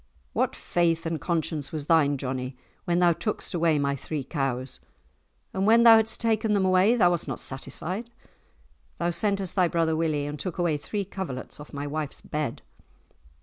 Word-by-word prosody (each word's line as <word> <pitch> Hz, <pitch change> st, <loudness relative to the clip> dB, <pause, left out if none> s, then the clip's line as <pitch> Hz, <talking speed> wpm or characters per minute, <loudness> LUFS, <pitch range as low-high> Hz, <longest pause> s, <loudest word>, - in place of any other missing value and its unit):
What -, -, 0 dB
faith 165 Hz, -1 st, 0 dB
and 165 Hz, -3 st, -2 dB
conscience 160 Hz, -3 st, -2 dB
was 155 Hz, -3 st, -4 dB
thine, 150 Hz, -3 st, +3 dB
Johnie, 130 Hz, -1 st, -4 dB, 0.3 s
when 175 Hz, 0 st, +1 dB
thou 175 Hz, -1 st, +5 dB
tookest 210 Hz, +4 st, -3 dB
away 165 Hz, -3 st, +2 dB
my 140 Hz, -1 st, 0 dB
three 145 Hz, +1 st, -4 dB
cows? 130 Hz, -2 st, -3 dB, 0.7 s
And 190 Hz, +1 st, 0 dB
when 230 Hz, +1 st, +6 dB
thou 230 Hz, -1 st, +9 dB
hadst 220 Hz, 0 st, +1 dB
taken 220 Hz, -1 st, +1 dB
them 195 Hz, -2 st, +2 dB
away, 185 Hz, +5 st, +4 dB
thou 180 Hz, -7 st, +4 dB
wast 170 Hz, -3 st, -2 dB
not 135 Hz, -, -3 dB
satisfied. 185 Hz, -, -5 dB, 0.9 s
Thou 175 Hz, 0 st, 0 dB
sentest 195 Hz, +1 st, 0 dB
thy 185 Hz, -3 st, +3 dB
brother 165 Hz, -1 st, +1 dB
Willie, 155 Hz, -3 st, 0 dB
and 145 Hz, 0 st, -5 dB
took 185 Hz, -2 st, -4 dB
away 170 Hz, -4 st, +1 dB
three 200 Hz, +7 st, -4 dB
coverlets 175 Hz, -10 st, -6 dB
off 150 Hz, -, -11 dB
my 140 Hz, 0 st, -5 dB
wife's 150 Hz, 0 st, -4 dB
bed!" 150 Hz, -5 st, -4 dB
165 Hz, 175 wpm, -26 LUFS, 145-190 Hz, 0.9 s, thou